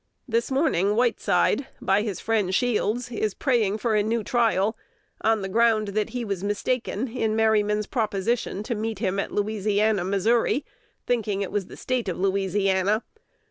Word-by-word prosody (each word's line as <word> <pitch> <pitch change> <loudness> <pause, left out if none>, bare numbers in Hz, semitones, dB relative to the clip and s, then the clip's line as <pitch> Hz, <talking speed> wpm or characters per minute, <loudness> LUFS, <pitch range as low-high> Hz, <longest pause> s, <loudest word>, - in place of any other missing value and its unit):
This 230 -1 0
morning 210 - +2
Whiteside, 225 +1 +2
by 195 +2 +2
his 210 -5 -3
friend 210 -5 0
Shields, 245 0 0
is 215 -3 -2
praying 225 -6 +1
for 225 0 -1
a 210 - +3
new 220 +2 -1
trial, 225 -2 +1 0.5
on 220 -2 +2
the - - -2
ground 220 0 +2
that 210 +2 -1
he 245 0 -4
was 195 -3 -3
mistaken 225 +3 -1
in 225 -2 -1
Merryman's 210 -1 +2
proposition 215 -1 -1
to 235 - -2
meet 220 0 -3
him 195 -2 -1
at - - -3
Louisiana, 210 -1 +1
Mo., 195 +2 0 0.9
thinking 210 -5 0
it 195 - -5
was 200 -3 -2
the - - -11
State 255 -6 -2
of 175 - -3
Louisiana. 195 +2 +1
215 Hz, 160 wpm, -25 LUFS, 200-230 Hz, 0.9 s, a